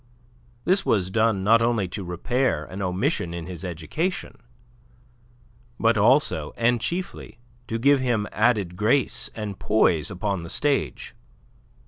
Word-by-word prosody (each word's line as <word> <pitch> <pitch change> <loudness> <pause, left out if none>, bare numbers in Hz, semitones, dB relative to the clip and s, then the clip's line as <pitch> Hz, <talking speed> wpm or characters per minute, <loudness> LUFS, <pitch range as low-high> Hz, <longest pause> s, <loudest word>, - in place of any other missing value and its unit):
This 190 +2 +3
was 95 -3 +1
done 110 -2 +2
not 115 +3 +5
only 115 -4 +1
to 95 +2 -5
repair 90 - -1
an 95 +5 -7
omission 90 - -1
in 85 -1 -5
his 90 -1 -8
education, 90 - -3 1.4
but 115 0 +3
also, 110 - +3
and 120 0 +2
chiefly, 180 -4 -4 0.3
to 115 - -2
give 140 +4 +4
him 120 -5 0
added 105 -6 +1
grace 115 +7 +1
and 105 -3 -5
poise 85 -7 +2
upon 100 0 -2
the 85 - -8
stage. 145 - -1
105 Hz, 130 wpm, -24 LUFS, 90-120 Hz, 1.4 s, not